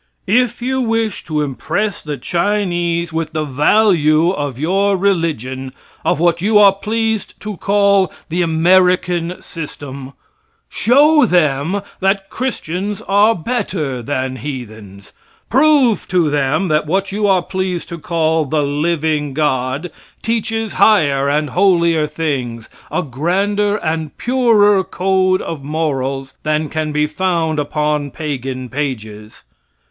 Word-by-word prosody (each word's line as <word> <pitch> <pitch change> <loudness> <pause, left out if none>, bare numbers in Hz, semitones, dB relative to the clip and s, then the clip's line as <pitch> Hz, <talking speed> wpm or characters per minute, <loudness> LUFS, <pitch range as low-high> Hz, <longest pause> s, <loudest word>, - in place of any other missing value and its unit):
If 240 +3 +1
you 260 +1 0
wish 225 -3 -1
to 155 -2 -1
impress 195 +9 -2
the 150 -2 -5
Chinese 175 0 -1
with 160 -1 -3
the 155 -1 -1
value 155 +2 +3
of 145 -8 -4
your 195 +6 +1
religion, 150 - -1 0.3
of - - +1
what 170 0 +2
you 210 +2 +3
are 200 -2 +7
pleased 220 +1 -2
to 210 -1 -5
call 200 -2 +2 0.2
"the 175 +3 -1
American 175 +1 +2
system," 140 -4 -8 0.5
show 290 +5 +4
them 175 +2 +1 0.2
that 195 +1 0
Christians 205 -5 -3
are 205 +3 +3
better 160 - -3
than 130 +1 -3
heathens. 110 -7 -8 0.4
Prove 270 -4 +3
to 170 -5 +1
them 145 +6 +1
that 155 0 +1
what 190 +4 0
you 205 +1 0
are 190 -3 +3
pleased 185 -2 -3
to 170 - -6
call 160 -1 0
the 150 +2 0
"living 150 -1 -1
God" 140 +2 -1 0.3
teaches 225 -1 -2
higher 140 -10 +4
and 150 -1 0
holier 170 -4 +3
things, 135 -7 -3 0.2
a 180 - -1
grander 195 +9 0
and 160 -4 -3
purer 220 -6 +3
code 185 0 +1
of 155 -4 -6
morals, 135 -3 -2
than 155 0 -1
can 155 -1 -2
be 150 0 +1
found 160 -1 -1
upon 150 0 -1
pagan 135 -4 -5
pages. 110 -6 -5
165 Hz, 125 wpm, -17 LUFS, 145-200 Hz, 0.5 s, are